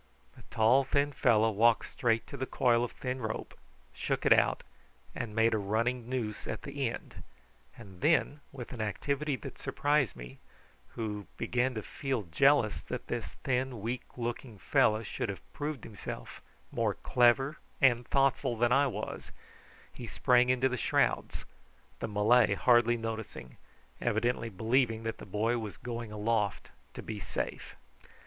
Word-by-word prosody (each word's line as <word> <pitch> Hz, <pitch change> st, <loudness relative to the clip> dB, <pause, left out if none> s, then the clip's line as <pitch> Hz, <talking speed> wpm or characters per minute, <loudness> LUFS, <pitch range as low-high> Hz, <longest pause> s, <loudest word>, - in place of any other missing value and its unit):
The -, -, -15 dB
tall 120 Hz, +5 st, +4 dB
thin 140 Hz, +2 st, +1 dB
fellow 110 Hz, -3 st, +3 dB
walked 115 Hz, +2 st, +3 dB
straight 115 Hz, -2 st, 0 dB
to -, -, -9 dB
the 130 Hz, -, -3 dB
coil 120 Hz, -2 st, +2 dB
of 120 Hz, -, -3 dB
thin 130 Hz, 0 st, -4 dB
rope, 110 Hz, -1 st, -4 dB, 0.4 s
shook -, -, -2 dB
it -, -, +8 dB
out, -, -, +2 dB, 0.5 s
and 105 Hz, -2 st, -5 dB
made 115 Hz, 0 st, +4 dB
a 110 Hz, -, +1 dB
running 115 Hz, +4 st, -1 dB
noose 115 Hz, -5 st, -3 dB
at -, -, -4 dB
the 140 Hz, -3 st, -2 dB
end, -, -, -8 dB, 0.6 s
and 95 Hz, -6 st, -13 dB
then, 155 Hz, -2 st, +2 dB
with 130 Hz, -2 st, -8 dB
an 120 Hz, -, -5 dB
activity 140 Hz, +7 st, -1 dB
that 120 Hz, -, -9 dB
surprised 145 Hz, -, +1 dB
me, 60 Hz, +1 st, -10 dB, 0.6 s
who 105 Hz, -3 st, -4 dB
began 125 Hz, +1 st, 0 dB
to 110 Hz, -, -4 dB
feel 135 Hz, -6 st, -3 dB
jealous 110 Hz, -, +3 dB
that -, -, -6 dB
this -, -, -4 dB
thin 130 Hz, -2 st, -1 dB
weak 120 Hz, +5 st, -3 dB, 0.2 s
looking 120 Hz, -1 st, -4 dB
fellow 110 Hz, +3 st, +2 dB
should 105 Hz, -, -4 dB
have 100 Hz, -, -8 dB
proved 145 Hz, -3 st, -4 dB
himself 105 Hz, -4 st, -8 dB, 0.3 s
more -, -, 0 dB
clever 130 Hz, +4 st, +3 dB, 0.2 s
and 125 Hz, -3 st, +4 dB
thoughtful 135 Hz, -3 st, +2 dB
than 120 Hz, +1 st, +2 dB
I 140 Hz, +2 st, +4 dB
was, 105 Hz, -4 st, -5 dB, 0.6 s
he 120 Hz, -, -8 dB
sprang 125 Hz, +1 st, +3 dB
into 130 Hz, +1 st, +3 dB
the 125 Hz, -1 st, -2 dB
shrouds, -, -, 0 dB, 0.5 s
the -, -, -3 dB
Malay 105 Hz, +1 st, +4 dB
hardly 120 Hz, +1 st, +4 dB
noticing, 110 Hz, -, -6 dB, 0.4 s
evidently 115 Hz, 0 st, 0 dB
believing 115 Hz, +2 st, +1 dB
that 110 Hz, 0 st, -4 dB
the -, -, -10 dB
boy 110 Hz, +5 st, 0 dB
was 110 Hz, -3 st, -6 dB
going 115 Hz, -2 st, -6 dB
aloft 105 Hz, -1 st, -1 dB, 0.2 s
to -, -, -7 dB
be 105 Hz, -, -5 dB
safe. 85 Hz, -, -5 dB
120 Hz, 155 wpm, -31 LUFS, 110-130 Hz, 0.6 s, it